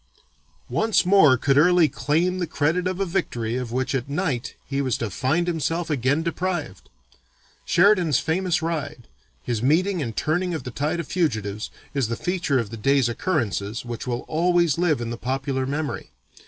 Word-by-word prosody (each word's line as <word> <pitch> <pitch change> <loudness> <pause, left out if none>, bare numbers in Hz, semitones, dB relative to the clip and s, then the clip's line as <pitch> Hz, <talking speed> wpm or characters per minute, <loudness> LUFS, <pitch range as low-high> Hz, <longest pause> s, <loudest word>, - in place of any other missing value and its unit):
Once 220 -3 +2
more 180 -9 +6
could 135 +3 +3
Early 175 0 +5
claim 175 +6 0
the 175 - -1
credit 160 +4 0
of 185 0 -3
a 195 - +1
victory 120 -10 -2
of 125 -2 -3
which 130 +3 -1
at 135 0 -2
night 140 -6 -2
he 140 0 -2
was 130 -5 0
to 110 -4 -3
find 150 - 0
himself 165 0 -1
again 140 +3 +1
deprived. 170 - -3 0.8
Sheridan's 175 - +4
famous 170 +2 0
ride, 155 -7 -4 0.4
his 115 -3 -2
meeting 175 +7 +2
and 115 -5 -4
turning 175 +3 0
of 150 - -5
the 125 - -6
tide 150 +7 -1
of 170 - -3
fugitives, 110 - -1 0.2
is 135 -5 0
the 115 - -2
feature 175 -5 -1
of 115 -4 -2
the 115 - -6
day's 135 +2 +2
occurrences 115 - -2
which 120 +1 -6
will 120 0 -2
always 170 -1 +1
live 160 -7 +2
in 115 0 -3
the 120 - -4
popular 130 +1 -2
memory. 145 +2 -3
145 Hz, 175 wpm, -24 LUFS, 125-175 Hz, 0.8 s, more